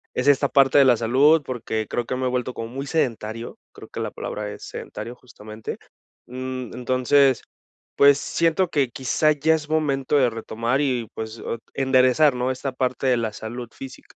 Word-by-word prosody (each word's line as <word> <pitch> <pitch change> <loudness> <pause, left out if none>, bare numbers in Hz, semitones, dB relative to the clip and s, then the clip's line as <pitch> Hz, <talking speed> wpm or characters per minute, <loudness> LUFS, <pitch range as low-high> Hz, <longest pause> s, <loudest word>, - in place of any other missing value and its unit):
es 130 +2 -1
esta 140 0 +4
parte 135 0 +5
de 140 - +7
la 125 -3 +5
salud, 140 +7 +4
porque, 110 -3 -3
creo 120 - -2
que 130 - -3
me 130 - -2
he - - +1
vuelto 125 0 -2
como 115 - -5
muy 135 +3 -6
sedentario. 115 -7 -2
Creo - - -12
que - - -7
la - - -2
palabra 105 0 -5
es - - -10
sedentario 120 - -7
justamente, 110 -3 -9 0.5
mm, 130 -1 -6
entonces, 130 +2 +2 0.5
pues 140 0 +6
siento 170 +2 +1
que 140 -6 +1
quizá 145 +4 +1
ya 160 +2 +2
es 150 -1 -6
momento 145 -3 +1
de 125 -3 +4
retomar 115 +4 -2
y 125 -5 -1
pues, 110 0 -6
ot 115 - -5
enderezar, 130 +1 +3
¿no?, 125 +1 0
esta 130 +1 -4
parte 130 0 -2
de 125 -2 +3
la 110 -2 -2
salud 120 +3 -7
física. 135 -1 -11
130 Hz, 185 wpm, -23 LUFS, 120-140 Hz, 0.5 s, de